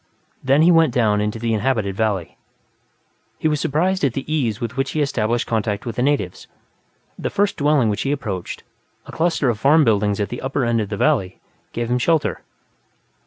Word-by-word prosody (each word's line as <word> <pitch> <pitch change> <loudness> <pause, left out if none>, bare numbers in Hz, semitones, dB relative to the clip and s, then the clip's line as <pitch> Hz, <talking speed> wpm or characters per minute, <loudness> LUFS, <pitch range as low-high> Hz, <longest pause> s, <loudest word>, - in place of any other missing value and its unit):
Then 135 +4 +4
he 175 - +6
went 165 -6 +4
down 105 -4 +2
into 105 +1 -2
the 115 0 -1
inhabited 110 -3 0
valley. 100 -5 -1 1.0
He - - 0
was 150 -2 0
surprised 180 +6 0
at 135 -4 +2
the 135 - -4
ease 130 -9 -1
with 115 +1 -4
which 135 +1 -2
he 155 - -1
established 120 -4 -1
contact 105 -2 -2
with 115 -2 -4
the - - 0
natives. 130 -10 -1 0.7
The - - -2
first 200 0 0
dwelling 145 -4 +2
which 105 -1 -1
he 140 - -1
approached, 105 -11 -4 0.4
a - - -10
cluster 165 -4 0
of 115 -4 0
farm 150 +5 +5
buildings 105 -4 +1
at 100 - -1
the 120 - -6
upper 135 -1 -1
end 115 -1 +1
of 105 - -4
the 105 - -4
valley, 100 -9 +1 0.3
gave 120 0 -3
him 125 - +2
shelter. 135 - +1
120 Hz, 195 wpm, -21 LUFS, 105-145 Hz, 1.0 s, he